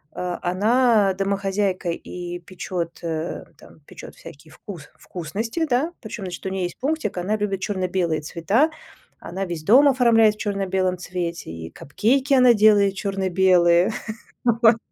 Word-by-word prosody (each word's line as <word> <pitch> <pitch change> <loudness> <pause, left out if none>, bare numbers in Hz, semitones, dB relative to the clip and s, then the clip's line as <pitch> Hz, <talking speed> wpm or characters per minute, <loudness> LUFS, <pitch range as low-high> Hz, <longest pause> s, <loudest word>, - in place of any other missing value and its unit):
э, 180 -1 -3
она- 210 +2 +2
домохозяйка 195 -1 -1
и 175 +1 -7
печет, 175 -1 -6
э, 165 0 -4 0.2
там - - -17
печет - - -12
всякие 150 +2 -14
вкус 170 -2 -11
вкусности, 215 - -4
да. 265 +7 +1
Причем, 220 -2 -7
значит, 180 - -7
у - - -1
ней 190 -1 -3
есть 175 - -5
пунктик: 290 -6 -2
она 195 +5 -1
любит 205 -2 -2
черно-белые 185 -5 -1
цвета. 195 - +1 0.5
Она 190 +3 -5
весь 170 -4 -6
дом 265 - +6
оформляет 230 -5 +4
в - - -23
черно-белом 190 -3 -1
цвете, 175 - -5
и 80 0 -8
капкейки 260 - 0
она 250 -2 +6
делает 205 -2 +4
черно-белые, 185 -2 +2 0.5
вот, 230 -1 +4
195 Hz, 140 wpm, -22 LUFS, 175-220 Hz, 0.5 s, дом